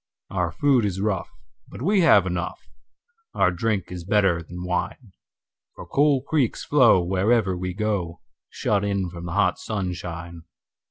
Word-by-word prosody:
Our 90 -3 -1
food 130 - +2
is 95 -2 -2
rough, 100 -3 -1 0.4
but - - -9
we 200 +4 +3
have 105 - +6
enough; 90 -1 -3 0.8
Our 90 - +3
drink 95 +1 -2
is 90 -1 -6
better 95 -3 +2
than 90 +2 -8
wine:For 90 +4 -7
cool 140 -2 +2
creeks 140 -5 0
flow 120 -10 +5
wherever 95 +2 +1
we 90 0 -4
go, 100 -6 -2 0.3
Shut 105 -1 -1
in 100 -3 -1
from 85 0 -8
the 85 - -5
hot 90 -2 +1
sunshine. 85 -4 -5
95 Hz, 145 wpm, -24 LUFS, 90-110 Hz, 0.8 s, have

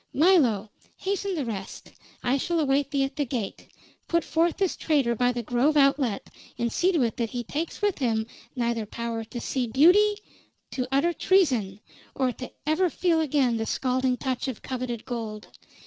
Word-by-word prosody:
"Milo, 260 - +4 0.3
hasten 395 0 -2
the 295 -5 -2
rest. 195 -4 -6 0.3
I 250 - +2
shall 340 +4 0
await 280 -1 +1
thee 280 -1 +1
at 270 - -3
the 295 - +2
gate. 235 -6 -4 0.4
Put 335 -1 +1
forth 330 +1 +1
this 385 -3 0
traitor 280 -7 +1
by 245 +2 +2
the 240 -1 -4
Grove 250 +7 +2
outlet, 275 -6 +2 0.3
and 235 -1 -1
see 365 +2 +3
to 315 -7 +3
it 230 +1 -1
that 230 -2 -1
he 245 0 -4
takes 315 - -4
with 410 -5 +1
him 225 -4 +1 0.3
neither 235 -3 -1
power 230 +1 -4
to 240 +2 -7
see 250 0 -2
beauty, 360 - +5 0.6
to 255 -2 -2
utter 295 +6 +2
treason, 250 - +2 0.3
or 260 -2 +1
to 255 +1 -8
ever 325 +4 +2
feel 335 0 +1
again 270 -6 +2
the 225 0 -2
scalding 255 -1 0
touch 260 0 -2
of 255 -5 -5
coveted 250 -3 -4
gold. 220 -3 -5
260 Hz, 180 wpm, -26 LUFS, 235-315 Hz, 0.6 s, beauty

